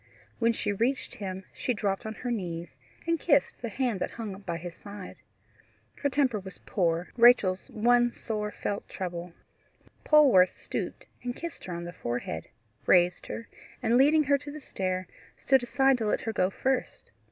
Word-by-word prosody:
When 230 -1 +4
she 215 -2 -1
reached 235 +4 0
him, 190 -2 -5
she 250 - -1
dropped 200 0 -1
on 220 - -5
her 245 +2 -4
knees, 175 -6 -4 0.3
and 335 -1 +1
kissed 285 -3 +2
the 235 - -3
hand 240 -3 -1
that - - -1
hung 220 -4 -6
by 170 -4 -4
his 175 +1 -7
side. 200 +1 -10 0.8
Her 285 - 0
temper 260 -5 +2
was 190 -1 -9
poor 170 -3 0
Rachel's 230 -6 +5
one 240 +2 +4
sore 210 -2 -3
felt 205 -1 -4
trouble. 175 -2 -5 0.7
Polwarth 260 -13 +6
stooped - - -5 0.2
and 245 0 -3
kissed 335 -1 -7
her 180 - -5
on 170 - -5
the 175 0 -7
forehead, 120 - -4 0.4
raised 175 -1 +4
her, 230 - -6 0.4
and 230 0 +3
leading 295 +4 +6
her 280 0 +3
to 290 - -9
the 305 - -7
stair, 185 -8 -3 0.3
stood 265 -2 +3
aside 270 +1 +3
to 220 - -1
let - - +1
her 225 - -3
go 185 -3 +2
first. 260 +6 -2
215 Hz, 175 wpm, -28 LUFS, 185-255 Hz, 0.8 s, Polwarth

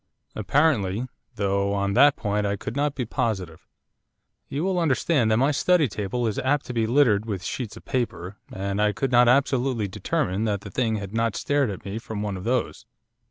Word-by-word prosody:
'Apparently, 115 -3 +1 0.3
though 100 -1 0
on 100 0 0
that 145 +5 +6
point 105 0 -1
I 100 0 0
could 105 - -6
not 145 0 0
be 125 - -2
positive. 95 -9 -3 0.8
You 145 +4 -2
will 185 -1 0
understand 145 -5 +2
that 110 - +3
my 135 +4 +3
study 165 +1 +3
table 105 +3 -3
is 110 -2 -1
apt 145 +2 0
to 125 - -6
be 115 -2 0
littered 115 -5 +3
with 100 -5 -4
sheets 115 +2 -5
of - - -14
paper, 110 -7 -3
and 100 +1 -2
I 105 0 +2
could 135 +3 -2
not 120 0 +6
absolutely 130 -3 +2
determine 95 +2 -1
that 100 -3 -1
the 100 - -9
thing 115 -1 0
had 100 -1 -6
not 115 -2 0
stared 145 -4 +1
at 95 - -7
me 100 +3 -4
from 110 -2 -5
one 105 -2 -3
of 95 - -7
those. 125 0 -1
115 Hz, 200 wpm, -25 LUFS, 100-130 Hz, 0.8 s, that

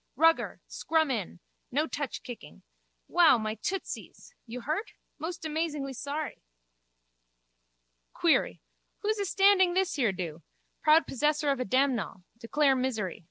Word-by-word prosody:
Rugger. 325 +1 +3
Scrum 315 -3 0
in. 205 -7 -3 0.3
No 295 +5 +2
touch 285 -3 -4
kicking. 245 -2 -10 0.4
Wow, 340 -7 +6
my 215 -1 -2
tootsies! 365 - -6
You 245 +2 -6
hurt? 315 - -3 0.3
Most 330 +2 -5
amazingly 300 -3 -2
sorry! 285 +4 -4 1.7
Query. - - +2 0.4
Who's 430 0 0
astanding 390 -2 +4
this 380 0 +1
here 245 -8 +2
do? 170 -4 -5 0.4
Proud 310 +2 +5
possessor 295 +2 +1
of 275 - -1
damnall. 255 -7 +1 0.2
Declare 270 +4 +2
misery. 220 -8 -2
290 Hz, 115 wpm, -29 LUFS, 245-325 Hz, 1.7 s, Wow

